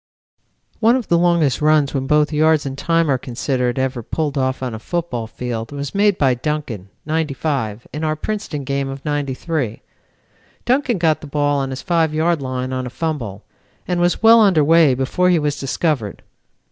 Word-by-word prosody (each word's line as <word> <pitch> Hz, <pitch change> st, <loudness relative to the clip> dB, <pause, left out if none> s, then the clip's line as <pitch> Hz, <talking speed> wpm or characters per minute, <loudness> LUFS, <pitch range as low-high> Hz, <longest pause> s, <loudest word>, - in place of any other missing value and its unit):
"One 230 Hz, +2 st, +4 dB
of 255 Hz, -3 st, -3 dB
the 170 Hz, -, +4 dB
longest 170 Hz, -6 st, +2 dB
runs 150 Hz, -2 st, +3 dB
when 135 Hz, -1 st, -2 dB
both 150 Hz, +1 st, +2 dB
yards 155 Hz, 0 st, +3 dB
and 135 Hz, -1 st, -4 dB
time 165 Hz, +3 st, +1 dB
are 135 Hz, -3 st, +1 dB
considered 125 Hz, 0 st, -2 dB
ever 130 Hz, -1 st, -1 dB
pulled 150 Hz, +5 st, -3 dB
off 130 Hz, -1 st, -1 dB
on 125 Hz, -3 st, -3 dB
a 110 Hz, -, -6 dB
football 130 Hz, -6 st, -3 dB
field, 115 Hz, 0 st, -5 dB
was 140 Hz, -1 st, -5 dB
made 205 Hz, -1 st, +3 dB
by 135 Hz, -3 st, +3 dB
Duncan, 125 Hz, -7 st, -4 dB, 0.2 s
'95, 140 Hz, -7 st, -2 dB
in 150 Hz, +2 st, -4 dB
our 155 Hz, 0 st, 0 dB
Princeton 155 Hz, -4 st, -4 dB
game 140 Hz, 0 st, -2 dB
of 135 Hz, 0 st, -8 dB
'93. 145 Hz, -3 st, -2 dB, 0.8 s
Duncan 255 Hz, -2 st, +1 dB
got 160 Hz, -3 st, +1 dB
the 150 Hz, -, -9 dB
ball 145 Hz, 0 st, +1 dB
on 135 Hz, -1 st, -2 dB
his 130 Hz, 0 st, -6 dB
5 165 Hz, -4 st, +1 dB
yard 165 Hz, 0 st, +1 dB
line 130 Hz, -1 st, -3 dB
on 130 Hz, -1 st, -3 dB
a -, -, -5 dB
fumble, 125 Hz, -, -4 dB, 0.4 s
and 175 Hz, -1 st, 0 dB
was 175 Hz, +4 st, +1 dB
well 225 Hz, +1 st, +8 dB
under 185 Hz, -8 st, +4 dB
way 160 Hz, -3 st, +5 dB
before 135 Hz, +8 st, +1 dB
he 180 Hz, -, +4 dB
was 150 Hz, -2 st, -1 dB
discovered. 135 Hz, -, -2 dB
145 Hz, 185 wpm, -19 LUFS, 130-165 Hz, 0.8 s, well